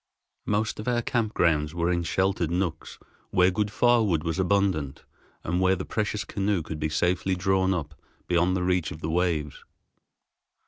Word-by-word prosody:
Most 105 +1 0
of 105 - -6
our 120 -1 +1
camp 115 -3 -1
grounds 75 -1 +1
were 85 +1 +1
in 85 -1 +1
sheltered 95 0 0
nooks 85 -2 -3 0.3
where 90 +1 +4
good 105 +2 -1
firewood 110 -8 +2
was 80 +2 -2
abundant, 95 -7 0 0.4
and 90 +2 -1
where 95 0 +4
the 95 - -5
precious 105 -1 -2
canoe 100 -3 -1
could 80 0 -6
be 75 0 -1
safely 90 +4 0
drawn 95 +1 +1
up 80 -5 -3 0.3
beyond 90 +1 +2
reach 90 -2 0
of 80 - -9
the 80 - -2
waves. 80 -4 -1
90 Hz, 165 wpm, -26 LUFS, 85-100 Hz, 0.4 s, where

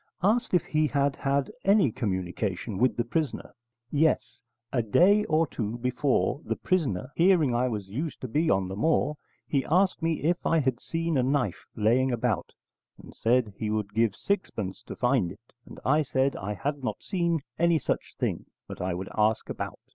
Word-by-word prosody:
Asked 220 +1 +2
if 175 - +2
he 155 0 +1
had 140 -1 +1
had 140 +4 0
any 195 - +4
communication 95 0 -3
with 130 +1 +2
the 120 - +2
prisoner, 145 +3 -3 0.4
'Yes, 155 -2 +1 0.3
a 125 - +2
day 185 - +4
or 160 +1 +2
two 115 -5 -4
before, 130 +4 0
the - - -2
prisoner, 135 - -1
hearing 170 -7 +4
I 120 +2 +2
was 105 -5 -4
used 140 +10 -4
to 130 - -4
be 155 +8 +1
on 95 -1 +2
the 95 - -5
moor, 150 +5 +1 0.3
he 140 -3 +1
asked 185 +3 +2
me 165 -2 -1
if 175 +3 +1
I 165 - +2
had 130 -5 +1
seen 165 -3 -1
a - - +4
knife 125 -7 -1
laying 120 +5 +2
about, 120 -4 -1 0.5
and - - -13
said 115 -2 +1
he 110 - -2
would 105 -1 -2
give 115 -2 +2
sixpence 110 - -2
to - - -6
find 125 -8 +1
it. 115 +5 -16
And - - -11
I 150 +4 +4
said 135 -1 +1
I 105 +2 -4
had 140 +4 -3
not - - -3
seen 170 -5 0 0.2
any 170 0 +4
such - - -3
thing, - - -2 0.2
but - - -8
I 90 -1 -1
would 95 +2 -5
ask 110 0 +1
about. - - -5
130 Hz, 185 wpm, -27 LUFS, 110-160 Hz, 0.5 s, any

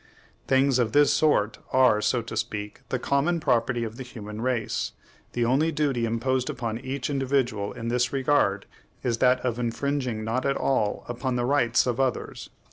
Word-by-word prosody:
Things 135 -1 +3
of 115 -3 0
this 145 0 +5
sort 130 -9 +2
are, 130 -5 +4
so 120 +1 +1
to 115 - -7
speak, 105 -1 -4
the 130 - 0
common 140 +7 +1
property 120 -4 +1
of 115 0 -6
the 130 - -5
human 110 -3 -8
race; 125 -2 -1 0.4
the 120 -1 +1
only 140 +7 +2
duty 140 -6 0
imposed 125 +3 0
upon 115 -2 -3
each 135 0 -4
individual 130 -7 0
in 115 0 -5
this 125 +1 +1
regard 130 -8 +1 0.4
is 115 -2 0
that 125 0 +4
of 125 -2 -2
infringing 120 -1 -2
not 115 +4 -1
at 140 0 +1
all 110 -6 0
upon 125 +1 -2
the 120 -1 0
rights 120 -3 +3
of 125 -1 -1
others." 130 -3 -2
125 Hz, 175 wpm, -26 LUFS, 115-135 Hz, 0.4 s, this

